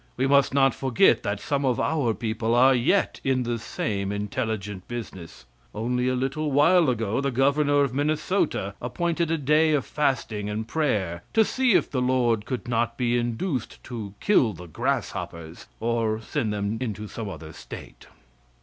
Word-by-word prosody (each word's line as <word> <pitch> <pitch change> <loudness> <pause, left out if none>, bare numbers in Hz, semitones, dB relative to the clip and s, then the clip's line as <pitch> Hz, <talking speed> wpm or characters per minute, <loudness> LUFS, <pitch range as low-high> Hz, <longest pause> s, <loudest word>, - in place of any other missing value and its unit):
We 130 - +1
must 140 0 +4
not 135 -1 +4
forget 130 -4 +3
that 100 0 -2
some 140 +6 -1
of 130 -3 +1
our 135 -9 +1
people 115 0 -1
are 130 +2 +6
yet 130 +11 +1
in 130 -1 +1
the 120 -1 -2
same 100 -2 -3
intelligent 105 -1 -3
business. 95 - -8 0.3
Only 125 +3 -1
a 130 - +1
little 140 +4 -1
while 150 +3 +5
ago 115 0 0
the 140 - 0
Governor 140 +2 +3
of 135 -3 -1
Minnesota 150 - 0
appointed 170 +6 -1
a 165 - +1
day 155 +2 +3
of 145 -3 +1
fasting 120 -8 -1
and 110 +1 -3
prayer 100 - -1
to 220 -1 +5
see 255 -1 +2
if - - +2
the 130 - 0
Lord 120 -4 +1
could 125 -2 -4
not 120 0 0
be 120 -1 +1
induced 120 - -2
to 110 -5 -7
kill 130 - +3
the 90 0 -10
grasshoppers 85 0 -4
or 115 -1 0
send 115 0 -2
them 105 +1 -2
into 105 -3 -4
some 110 0 -6
other 80 -3 -9
State. - - -11
120 Hz, 165 wpm, -25 LUFS, 105-140 Hz, 0.3 s, are